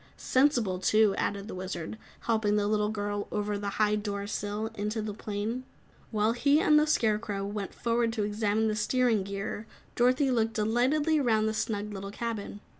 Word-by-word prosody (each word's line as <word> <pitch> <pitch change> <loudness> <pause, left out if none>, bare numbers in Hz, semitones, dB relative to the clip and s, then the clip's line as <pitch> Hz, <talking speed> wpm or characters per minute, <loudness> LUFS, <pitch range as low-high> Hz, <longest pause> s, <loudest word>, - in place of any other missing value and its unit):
"Sensible, 245 -9 +2
too," 215 +2 +4
added 200 0 -2
the - - -6
Wizard, 185 -1 -5 0.3
helping 220 -3 +1
the 205 -1 +2
little 210 0 +1
girl 205 -1 -3
over 210 0 -1
the 200 0 -3
high 210 -1 +3
door 205 -1 -3
sill 205 +1 -3
and 225 - -14
into 210 +2 -1
the 215 -1 -3
plane. 215 +4 -3 0.5
While 215 0 +2
he 280 +5 +3
and 300 -2 +5
the 305 - +2
Scarecrow 210 -6 +1
went 200 -1 -5
forward 235 0 +1
to 215 -2 -1
examine 210 +1 +1
the 215 - 0
steering 230 0 +2
gear, 200 +2 -5 0.3
Dorothy 255 +3 +3
looked 225 -2 +1
delightedly 255 +9 +2
'round 220 -5 +2
the 220 - 0
snug 210 -1 -2
little 195 0 -6
cabin. 210 -1 -5
215 Hz, 180 wpm, -29 LUFS, 205-230 Hz, 0.5 s, and